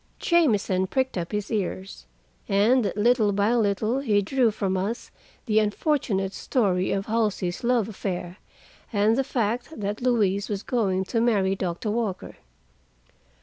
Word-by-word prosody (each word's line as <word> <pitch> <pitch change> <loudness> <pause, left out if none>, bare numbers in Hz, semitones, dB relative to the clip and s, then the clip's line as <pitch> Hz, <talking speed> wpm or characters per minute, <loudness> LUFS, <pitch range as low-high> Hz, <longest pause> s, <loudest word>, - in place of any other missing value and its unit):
Jamieson 210 - +2
pricked 260 +4 -1
up 170 -2 -3
his 210 +1 -3
ears, 190 - -4 0.4
and 215 +3 +3
little 220 0 +3
by 205 +3 +1
little 220 +2 +1
he 220 -7 +2
drew 240 +4 +2
from 195 -3 -2
us 200 +6 -3 0.3
the 220 -3 +3
unfortunate 210 - 0
story 190 -8 0
of 195 0 -1
Halsey's 210 -5 -1
love 235 -3 +2
affair, 185 -4 -5 0.5
and 210 0 +3
the 270 - +1
fact 240 +4 -2
that 205 +2 -3
Louise 210 -5 +1
was 205 -1 -3
going 195 -6 0
to 225 +4 -1
marry 200 -5 +2
Doctor 185 +3 -3
Walker. 215 -4 -3
210 Hz, 140 wpm, -25 LUFS, 195-235 Hz, 0.5 s, and